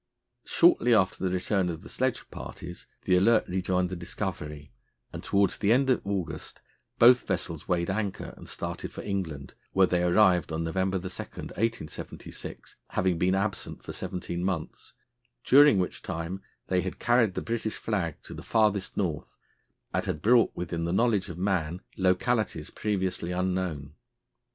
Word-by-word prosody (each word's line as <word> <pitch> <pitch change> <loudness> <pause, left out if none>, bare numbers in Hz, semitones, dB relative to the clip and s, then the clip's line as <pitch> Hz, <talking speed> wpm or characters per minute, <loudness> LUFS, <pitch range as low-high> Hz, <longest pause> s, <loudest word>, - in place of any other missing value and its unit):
Shortly 320 - +5
after 95 -3 +1
the 95 - +2
return 95 +1 0
of 80 -2 -5
the - - -10
sledge - - -1
parties 85 +1 -8 0.2
the 90 - +3
Alert 110 +4 +4
rejoined 90 0 0
the - - -2
Discovery, 75 -5 -5 0.4
and, - - -6
towards 100 0 +2
the 105 0 +2
end 130 +2 +4
of 125 - +2
August, 100 -4 -4 0.4
both 125 +1 +6
vessels 85 -4 -3
weighed 90 0 +1
anchor 100 -1 -3
and - - -12
started - - -5
for - - -8
England, 85 -9 -4 0.2
where 95 0 +6
they 90 -1 +1
arrived 90 -2 +4
on 80 +1 -1
November 95 +3 0
2, 90 - -6
1876, 100 0 -5
having 90 -2 +1
been 95 +1 +3
absent 100 0 -3
for - - -7
seventeen 90 -1 -4
months, 90 -5 -4 0.5
during 145 -3 +7
which 90 -1 -1
time 90 +2 -4 0.2
they 90 -1 +1
had 95 +1 -4
carried 120 -5 +3
the - - -1
British 115 -1 -2
flag 95 -8 -2
to - - -9
the - - -8
"farthest 105 -3 +1
North," 85 -7 -2 0.6
and - - +1
had 75 - -3
brought 120 +1 +5
within 85 -1 -3
the 85 - -1
knowledge 105 -2 +2
of 85 - -7
man 90 -3 0 0.2
localities 95 +5 +1
previously 95 -4 -1
unknown. 90 -6 -2
95 Hz, 155 wpm, -28 LUFS, 85-105 Hz, 0.6 s, during